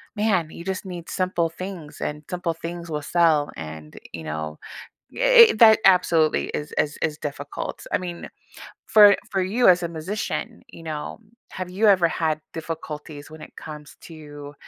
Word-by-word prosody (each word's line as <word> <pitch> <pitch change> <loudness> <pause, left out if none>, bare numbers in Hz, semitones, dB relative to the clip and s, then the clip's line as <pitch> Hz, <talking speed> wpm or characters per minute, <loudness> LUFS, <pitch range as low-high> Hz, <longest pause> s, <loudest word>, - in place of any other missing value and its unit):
"Man, 200 -7 +1
you 170 - -9
just 190 +1 -4
need 175 -3 -8
simple 180 -3 0
things, 170 -2 -8
and 150 0 -4
simple 180 -2 -2
things 170 +1 -7
will 150 -1 -2
sell," 160 -3 +2
and, 80 -1 -9 0.2
you 80 - -7
know, 80 0 -5 0.5
it - - +7
it - - -8
that 220 -2 +8
absolutely 170 -4 +3
is 150 0 -5
is 150 - 0
is 155 -2 0
difficult, 145 -1 -6
I - - +2
mean, 175 -1 -7 0.6
for 205 -2 +8 0.2
for 195 -2 0
you 210 +6 +3
as 180 -1 +4
a - - -1
musician, 200 +7 -5
you 165 - -13
know, 155 +2 -6 0.3
have 185 -1 -6
you 200 +4 +1
ever 185 -4 +5
had 155 -2 -1
difficulties 155 -2 -7
when 155 - -11
it - - -12
comes 150 -2 -10
to, 145 -3 -11
165 Hz, 170 wpm, -23 LUFS, 150-185 Hz, 0.6 s, that